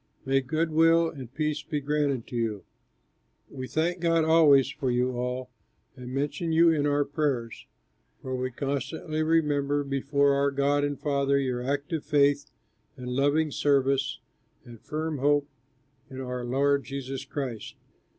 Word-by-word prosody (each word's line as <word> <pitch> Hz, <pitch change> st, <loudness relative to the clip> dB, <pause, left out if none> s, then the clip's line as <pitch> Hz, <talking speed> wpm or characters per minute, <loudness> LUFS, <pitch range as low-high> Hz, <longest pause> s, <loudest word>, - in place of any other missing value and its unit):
May 135 Hz, 0 st, +2 dB
good 160 Hz, +5 st, -1 dB
will 165 Hz, +1 st, +4 dB
and 130 Hz, -5 st, -9 dB
peace 150 Hz, +1 st, -2 dB
be 150 Hz, 0 st, -3 dB
granted 145 Hz, -4 st, -1 dB
to -, -, -9 dB
you. 110 Hz, -4 st, -2 dB, 0.9 s
We 130 Hz, -2 st, -6 dB
thank 170 Hz, +5 st, -1 dB
God 165 Hz, -1 st, +2 dB
always 150 Hz, -5 st, +6 dB
for 140 Hz, -3 st, -3 dB
you 125 Hz, +1 st, +1 dB
all 125 Hz, +1 st, -3 dB, 0.4 s
and 125 Hz, -1 st, -9 dB
mention 145 Hz, +5 st, -2 dB
you 165 Hz, +1 st, +5 dB
in 145 Hz, -2 st, +1 dB
our 145 Hz, 0 st, +2 dB
prayers, 140 Hz, -6 st, -2 dB, 0.5 s
for 130 Hz, 0 st, -4 dB
we 130 Hz, 0 st, -2 dB
constantly 140 Hz, +4 st, -3 dB
remember 145 Hz, -3 st, +1 dB
before 140 Hz, +1 st, +1 dB
our 140 Hz, 0 st, +2 dB
God 140 Hz, +1 st, +1 dB
and 145 Hz, -1 st, -2 dB
Father 140 Hz, -1 st, +1 dB
your 130 Hz, -3 st, -1 dB
active 145 Hz, +4 st, -2 dB
faith 145 Hz, -1 st, +2 dB, 0.5 s
and 125 Hz, -1 st, -6 dB
loving 145 Hz, +4 st, +1 dB
service 135 Hz, -1 st, +1 dB, 0.5 s
and 120 Hz, -2 st, -13 dB
firm 155 Hz, -1 st, -3 dB
hope 145 Hz, +1 st, +2 dB, 0.6 s
in 130 Hz, -1 st, -8 dB
our 125 Hz, -1 st, -4 dB
Lord 140 Hz, +3 st, +1 dB
Jesus 135 Hz, -1 st, -5 dB
Christ. 135 Hz, -5 st, -5 dB
140 Hz, 150 wpm, -27 LUFS, 130-150 Hz, 0.9 s, always